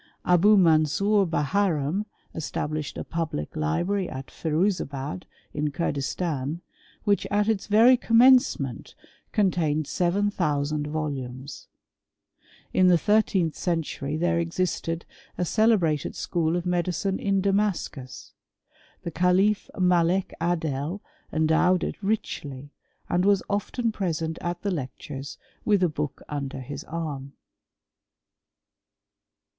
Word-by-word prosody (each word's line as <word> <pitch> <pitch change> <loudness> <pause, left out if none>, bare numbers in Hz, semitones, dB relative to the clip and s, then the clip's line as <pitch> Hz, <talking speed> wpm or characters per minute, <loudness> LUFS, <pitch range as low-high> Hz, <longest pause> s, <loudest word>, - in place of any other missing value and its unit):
Abou 195 +4 +5
Mansor 185 +4 +3
Baharani, 170 +2 0 0.3
established 155 -1 -3
a - - -3
public 160 - -4
library 175 - 0
at 130 +1 -7
Firuzabad 160 -2 -1 0.3
in 150 0 -1
Curdistan, 150 0 -2 0.4
which 205 -2 +1
at 205 +1 +1
its 220 -3 0
very 230 +5 +6
commencement 235 - +3 0.4
contained 160 -7 +1
7000 160 -6 0
volumes. 140 -3 -5 1.1
In 185 - +5
the 180 -1 +6
thirteenth 190 -3 +2
century 155 -4 -2
there 170 +1 +1
e:<isted 170 -1 -2 0.3
a 180 - 0
celebrated 180 -7 +2
school 165 -2 0
of 175 0 -2
medicine 180 +2 0
in 195 -1 +1
Damascus. 195 -9 -2 0.7
The 170 - -4
cahfMalek 180 0 +2
Adol 165 +1 -1 0.3
endowed 160 +3 +3
it - - -4
richly, 145 -9 -3 0.4
and 175 +1 +1
was 200 -1 +3
often 220 +3 -1
present 165 -6 -2
at 175 0 -4
the 200 - 0
lectures 140 -2 -6 0.3
with 205 -3 +3
a 180 - +3
book 150 -2 -4
under 140 -2 -4
his 140 +3 -7
arm. 145 -4 -5
170 Hz, 105 wpm, -26 LUFS, 150-195 Hz, 1.1 s, very